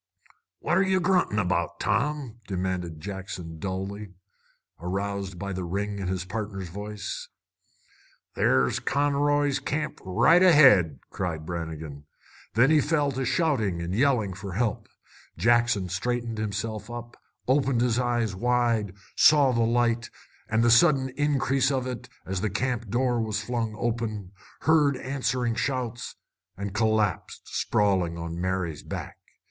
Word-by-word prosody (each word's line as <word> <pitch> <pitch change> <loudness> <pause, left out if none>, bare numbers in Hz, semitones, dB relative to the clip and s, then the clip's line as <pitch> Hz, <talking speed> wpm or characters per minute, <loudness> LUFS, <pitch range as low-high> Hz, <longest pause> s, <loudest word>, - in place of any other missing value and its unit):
"What're 180 +2 +2
ye 190 -1 +2
gruntin' 180 - +2
about, 90 -4 0
Tom?" 140 -6 -1
demanded 90 -4 -3
Jackson 90 -3 -7
dully, 95 +2 -5 0.6
aroused 95 +1 -3
by 100 +2 -4
the 95 0 -3
ring 100 +3 -3
in 95 - -3
his 95 0 -2
partner's 100 -3 -5
voice. 105 +2 -6 1.0
"There's 65 -1 +2
Conroy's 145 0 +1
Camp 150 +2 -3
right 120 - +4
ahead!" 130 - +6
cried 85 -4 -3
Brannigan. 80 -4 -6 0.5
Then 125 +6 +5
he 155 -1 +5
fell 145 -1 +1
to 135 0 -3
shouting 115 - +1
and 85 +1 -3
yelling 115 -4 +2
for 100 0 -7
help. 110 +2 -1 0.5
Jackson 115 -5 +3
straightened 115 +5 -2
himself, 110 +1 -3 0.6
opened 135 -2 +2
his 120 -1 +2
eyes 120 -4 0
wide, 115 -2 +1 0.2
saw 145 -3 +6
the 115 -1 +1
light, 115 0 +1 0.4
and 110 +1 +2
the 120 - +4
sudden 130 +1 +5
increase 135 -1 +1
of 130 -2 -1
it 125 -2 -6 0.2
as 95 -1 -3
the 110 - 0
camp 120 +1 -2
door 120 +1 +1
was 110 -1 -2
flung 115 -1 -2
open, 110 -5 -3 0.3
heard 150 -3 +3
answering 130 -2 -1
shouts, 120 0 -3 0.4
and 100 0 -4
collapsed 110 -1 0
sprawling 95 -5 +1
on 85 +1 -5
Mary's 90 -4 -2
back. - - -7
110 Hz, 130 wpm, -26 LUFS, 95-130 Hz, 1.0 s, ahead